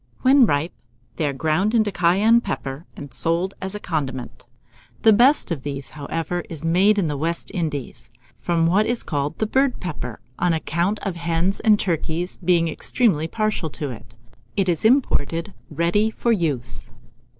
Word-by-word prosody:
When 265 -2 +6
ripe, 145 +2 0 0.4
they 155 - 0
are - - 0
ground 160 - +1
into 215 -2 +3
cayenne 195 +7 +4
pepper, 135 - -5
and 145 -2 -9
sold 170 +4 0
as 190 +2 -3
a - - -4
condiment. 135 -9 -4 0.6
The 220 - +7
best 245 +1 +4
of 155 -5 -2
this, 140 -1 -6
however, 165 +4 -3
is 165 -1 -7
made 190 +6 +4
in 195 - +2
the 150 -2 -1
West 165 +4 -3
Indies, 150 - -4 0.3
from 170 -2 +1
what 195 +6 +3
is 240 0 -1
called 145 -1 -2
the 220 - 0
Bird 265 +3 +1
pepper, 135 - -5 0.2
on 175 - +2
account 170 +5 0
of 190 -4 -3
hens 170 +3 0
and 210 -2 +4
turkeys 170 0 -2
being 170 -1 +3
extremely 160 -1 +1
partial 215 -4 -1
to 145 -1 -5
it. 110 -2 -12 0.4
It 195 -2 +2
is 170 -3 0
imported 200 - +2 0.2
ready 170 +8 +1
for 235 +2 -1
use. 135 - -2
170 Hz, 165 wpm, -22 LUFS, 150-205 Hz, 0.6 s, The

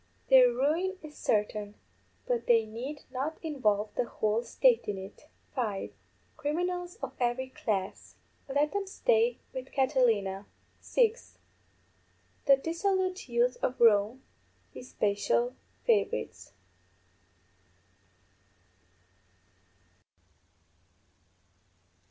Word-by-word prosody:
Their 260 -1 +9
ruin 320 +10 0
is 300 -1 -10
certain, 210 -1 -1 0.5
but - - -1
they 230 -2 +5
need 250 +7 -7
not 280 +5 -3
involve 215 -9 0
the 250 - 0
whole 215 -1 0
State 480 - +3
in 205 -2 -2
it._ 190 +9 -10 0.3
(5) 215 -7 -2 0.4
Criminals 355 +4 -2
of - - -4
every 250 +1 0
class; 200 -6 -3 0.3
let 285 +2 +1
them 405 -1 -2
stay 465 +3 +2 0.2
with 260 0 -6
Catilina. 230 -8 +1 0.3
(6) 470 -1 0 1.1
_The 275 -1 +5
dissolute 370 0 -1
youth 240 +1 +2
of 255 - -1
Rome, 225 +2 +4 0.5
his 250 - -10
special 225 +4 0 0.3
favourites. 475 0 0
260 Hz, 90 wpm, -30 LUFS, 220-350 Hz, 1.1 s, Their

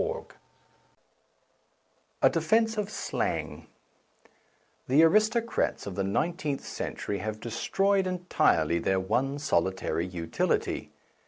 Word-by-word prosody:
A - - +8
DEFENCE 225 0 +2
OF 205 -1 -2
SLANG - - -3 1.2
THE 140 +5 +5
aristocrats 215 +6 +2
of 100 - -5
the 100 - -1
nineteenth 145 - -1
cen - - -4
tury 100 - -3
have 110 +2 -4
destroyed 195 - +1
entirely 130 - +2
their 95 +2 +1
one 130 +9 0
solitary 95 - 0
utility. 85 -2 -1
135 Hz, 95 wpm, -28 LUFS, -, 1.2 s, A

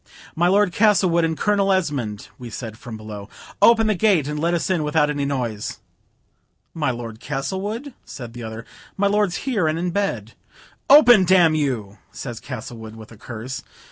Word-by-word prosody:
"My 175 +2 +2
Lord 200 0 +3
Castlewood 185 -3 +3
and 160 -1 0
Colonel 200 -2 +2
Esmond," 140 - -1
we 120 -1 -8
said, 110 0 -7
from 115 0 -9
below. 105 -1 -9 0.3
"Open 230 -1 +6
the 215 - +2
gate 185 -7 +2
and 150 0 -3
let 170 +2 +1
us 170 - -1
in 185 -4 +1
without 150 0 +2
any 145 -1 -2
noise." 120 -7 -3 1.0
"My 150 -4 -1
Lord 115 -3 -5
Castlewood?" 195 - -4
says 120 -4 -9
the 120 +1 -9
other; 110 0 -7 0.3
"my 200 - +1
lord's 200 -3 +2
here, 220 - +1
and 155 +1 0
in 175 +1 -2
bed." 130 - -2 0.6
"Open, 245 -8 +8
d 185 +1 +4
n 170 -4 +5
you," 125 -10 -2
says 120 -4 -7
Castlewood, 120 -4 -8
with 110 0 -12
a - - -12
curse. 125 +4 -7
150 Hz, 175 wpm, -22 LUFS, 120-190 Hz, 1.0 s, Open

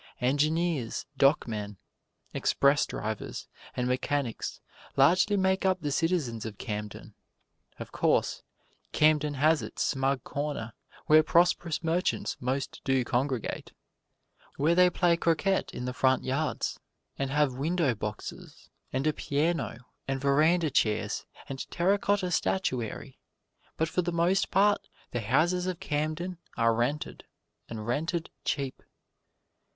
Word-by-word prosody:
Engineers, 145 0 0
dockmen, 110 -8 +2 0.6
express 140 +1 +3
drivers 110 0 -5 0.3
and 125 0 0
mechanics 130 -1 -2 0.4
largely 180 +9 +4
make 190 0 +2
up 190 -1 +2
the 145 - -2
citizens 150 -8 0
of 110 -3 -6
Camden. 105 -2 -6 0.6
Of - - -8
course, - - +1 0.5
Camden 150 -1 +3
has 155 +3 +3
its - - -3
smug 135 -1 0
corner 140 -6 -4 0.3
where 155 +1 +7
prosperous 170 0 +2
merchants 170 +3 0
most 130 +2 -3
do 135 -2 +1
congregate: 130 -2 -2 0.8
where 150 +4 +2
they 180 +1 +6
play 175 -1 +2
croquet 170 +4 +1
in 125 - -5
the 125 - -3
front 130 0 +2
yards, 140 +4 -2 0.4
and 135 -1 -1
have 145 -1 +2
window 155 +1 +1
boxes, 105 -1 -7 0.2
and 130 +2 -1
a 155 - +3
piano 150 -3 -1 0.3
and 135 0 -1
veranda 155 +4 +3
chairs 110 -5 0 0.2
and 135 -1 -6
terra 195 +4 +2
cotta 200 -3 +1
statuary; 130 - -1 0.6
but 160 - +1
for 180 - 0
the 175 0 -2
most 175 +3 +2
part 205 +2 +2 0.2
the 120 - -2
houses 170 - +2
of 180 -2 -3
Camden 155 +4 -2 0.2
are 115 0 +3
rented, 125 +6 -2 0.5
and 110 -2 -6
rented 160 +7 -2
cheap. 135 -2 -2
145 Hz, 125 wpm, -29 LUFS, 130-170 Hz, 0.8 s, where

